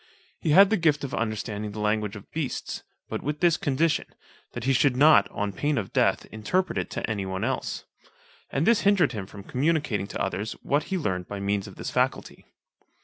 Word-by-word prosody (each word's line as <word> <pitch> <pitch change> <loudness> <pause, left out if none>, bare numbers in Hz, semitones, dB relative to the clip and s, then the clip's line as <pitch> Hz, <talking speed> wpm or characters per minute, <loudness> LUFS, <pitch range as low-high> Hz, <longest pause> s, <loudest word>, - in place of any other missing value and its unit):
He - - -2
had 195 +6 +7
the 220 - +4
gift 150 -3 +3
of 140 - -4
understanding 110 -2 -3
the 110 - -6
language 105 0 0
of 105 - -12
beasts, 155 -5 -3 0.3
but - - -4
with 150 +1 -3
this 170 -2 +4
condition, 160 -2 +1 0.5
that 120 - -5
he 135 +2 +2
should 130 0 +3
not, 150 +3 +6
on 105 -1 -3
pain 145 +7 0
of 100 -4 -3
death, - - +2
interpret 145 - -1
it - - -4
to - - -3
any 100 -3 -2
one 95 +2 -3
else. 130 +3 -2 0.6
And - - 0
this 235 -1 +4
hindered 195 - +4
him 105 -5 -5
from 100 0 -11
communicating 140 -6 0
to - - -6
others 100 +3 -2
what 145 +2 +1
he 190 - -2
learned 90 - -2
by 100 - -5
means 100 0 -1
of - - -11
this - - -5
faculty. - - -1
125 Hz, 200 wpm, -26 LUFS, 105-155 Hz, 0.6 s, had